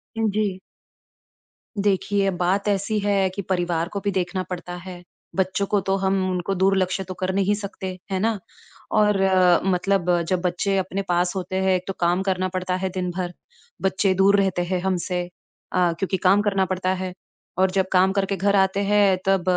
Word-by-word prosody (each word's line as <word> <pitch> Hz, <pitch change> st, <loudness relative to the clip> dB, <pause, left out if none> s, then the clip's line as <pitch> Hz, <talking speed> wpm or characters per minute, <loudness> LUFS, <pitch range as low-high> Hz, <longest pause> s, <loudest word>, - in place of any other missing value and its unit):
अ, -, -, -5 dB, 0.2 s
जी। 200 Hz, -3 st, 0 dB, 1.3 s
देखिए 195 Hz, 0 st, +1 dB
बात 190 Hz, +3 st, +1 dB
ऐसी 205 Hz, +1 st, 0 dB
है 200 Hz, -2 st, +1 dB
कि 185 Hz, +2 st, -5 dB
परिवार 175 Hz, -2 st, 0 dB
को 200 Hz, -, -2 dB
भी 200 Hz, -, 0 dB
देखना 185 Hz, 0 st, -1 dB
पड़ता 175 Hz, 0 st, -5 dB
है, 180 Hz, 0 st, -9 dB, 0.3 s
बच्चों 190 Hz, +1 st, 0 dB
को 205 Hz, -, +2 dB
तो 195 Hz, -, +3 dB
हम 190 Hz, -1 st, 0 dB
उनको 185 Hz, +1 st, -2 dB
दुर्लक्ष्य 190 Hz, 0 st, +1 dB
तो 185 Hz, -, -7 dB
कर 185 Hz, +1 st, -2 dB
नहीं 200 Hz, +1 st, +2 dB
सकते, 195 Hz, -2 st, -6 dB
है 190 Hz, -, 0 dB
ना? 220 Hz, +1 st, 0 dB, 0.5 s
और 210 Hz, -1 st, +3 dB, 0.5 s
मतलब 180 Hz, -2 st, +1 dB
जब 185 Hz, -1 st, +1 dB
बच्चे 185 Hz, +2 st, 0 dB
अपने 190 Hz, +1 st, -2 dB
पास 175 Hz, +2 st, +1 dB
होते 185 Hz, 0 st, -4 dB
हैं 190 Hz, -1 st, +2 dB
तो 195 Hz, -, -2 dB
काम 175 Hz, +2 st, +2 dB
करना 185 Hz, -1 st, 0 dB
पड़ता 185 Hz, 0 st, -2 dB
है 190 Hz, +1 st, -2 dB
दिन-भर, 180 Hz, -1 st, -3 dB, 0.5 s
बच्चे 190 Hz, 0 st, +2 dB
दूर 195 Hz, +2 st, +4 dB
रहते 190 Hz, -2 st, 0 dB
हैं 185 Hz, +1 st, -1 dB
हम 190 Hz, -1 st, 0 dB
से 180 Hz, -2 st, -1 dB, 0.5 s
अ, 180 Hz, -2 st, +2 dB
क्योंकि 195 Hz, 0 st, 0 dB
काम 195 Hz, +2 st, +4 dB
करना 195 Hz, -2 st, +1 dB
पड़ता 185 Hz, 0 st, -2 dB
है, 185 Hz, -1 st, -4 dB, 0.4 s
और 190 Hz, 0 st, +3 dB
जब 190 Hz, 0 st, +1 dB
काम 185 Hz, +1 st, +4 dB
करके 195 Hz, 0 st, 0 dB
घर 200 Hz, +2 st, +2 dB
आते 190 Hz, 0 st, +2 dB
हैं 200 Hz, -2 st, +3 dB
तब 195 Hz, -2 st, +2 dB
190 Hz, 180 wpm, -23 LUFS, 180-195 Hz, 1.3 s, दूर